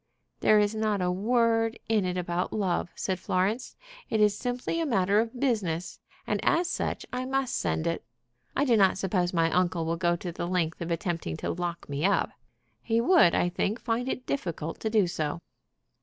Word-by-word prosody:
"There 215 Hz, -, +5 dB
is 210 Hz, 0 st, +3 dB
not 215 Hz, -2 st, 0 dB
a 180 Hz, -1 st, +1 dB
word 225 Hz, +3 st, +2 dB
in 215 Hz, -4 st, +2 dB
it 180 Hz, 0 st, -2 dB
about 175 Hz, 0 st, -1 dB
love," 185 Hz, -4 st, 0 dB
said 190 Hz, -2 st, -2 dB
Florence. 200 Hz, +9 st, -1 dB, 0.3 s
"It 220 Hz, -, +1 dB
is 210 Hz, -1 st, +4 dB
simply 250 Hz, +8 st, -2 dB
a 330 Hz, -, 0 dB
matter 200 Hz, -4 st, +3 dB
of 230 Hz, +2 st, -2 dB
business, 195 Hz, -11 st, -1 dB, 0.3 s
and -, -, 0 dB
as 345 Hz, +1 st, +3 dB
such -, -, -2 dB
I 250 Hz, 0 st, -1 dB
must 270 Hz, -1 st, -1 dB
send 160 Hz, -, -1 dB
it. 170 Hz, 0 st, -1 dB, 0.5 s
I 285 Hz, -, +2 dB
do 245 Hz, -4 st, +4 dB
not 195 Hz, -3 st, +4 dB
suppose 185 Hz, -2 st, 0 dB
my 165 Hz, -2 st, +2 dB
uncle 175 Hz, -2 st, +1 dB
will 165 Hz, +1 st, -1 dB
go 175 Hz, 0 st, +2 dB
to 175 Hz, 0 st, -5 dB
the 170 Hz, -, -4 dB
length 175 Hz, -3 st, -1 dB
of 170 Hz, -, -3 dB
attempting 165 Hz, -, -2 dB
to -, -, -2 dB
lock 175 Hz, 0 st, -4 dB
me 140 Hz, +1 st, -3 dB
up. 200 Hz, +2 st, +2 dB, 0.5 s
He 225 Hz, 0 st, +1 dB
would, 285 Hz, -, +5 dB
I -, -, +2 dB
think, 200 Hz, +5 st, -1 dB
find 240 Hz, +2 st, -1 dB
it 250 Hz, -, -4 dB
difficult 170 Hz, -, -3 dB
to 220 Hz, -, -1 dB
do 215 Hz, -3 st, +3 dB
so." 155 Hz, -2 st, -2 dB
195 Hz, 195 wpm, -28 LUFS, 175-225 Hz, 0.5 s, There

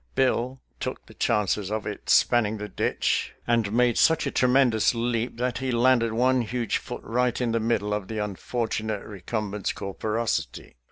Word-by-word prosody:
Bill 130 Hz, 0 st, +1 dB, 0.2 s
took -, -, -5 dB
the -, -, -15 dB
chances 105 Hz, -1 st, 0 dB
of 110 Hz, -1 st, -3 dB
its -, -, -4 dB
spanning 110 Hz, -3 st, +3 dB
the 105 Hz, 0 st, -5 dB
ditch, -, -, -1 dB
and 115 Hz, -4 st, +1 dB
made 120 Hz, +1 st, +3 dB
such 160 Hz, -1 st, +4 dB
a -, -, -1 dB
tremendous 125 Hz, -3 st, +3 dB
leap 115 Hz, 0 st, -1 dB
that 125 Hz, 0 st, -1 dB
he 130 Hz, 0 st, -2 dB
landed 120 Hz, -1 st, +3 dB
one 125 Hz, +3 st, +2 dB
huge 120 Hz, +1 st, -1 dB
foot -, -, -8 dB
right 125 Hz, +1 st, 0 dB
in 120 Hz, -2 st, 0 dB
the 115 Hz, -, +1 dB
middle 105 Hz, -2 st, 0 dB
of 105 Hz, -2 st, -3 dB
the 110 Hz, -, -5 dB
unfortunate 110 Hz, +1 st, -3 dB
re 100 Hz, -3 st, -10 dB
cumbent's 105 Hz, 0 st, -2 dB
corporosity. 100 Hz, -, -3 dB
115 Hz, 170 wpm, -26 LUFS, 105-125 Hz, 0.2 s, such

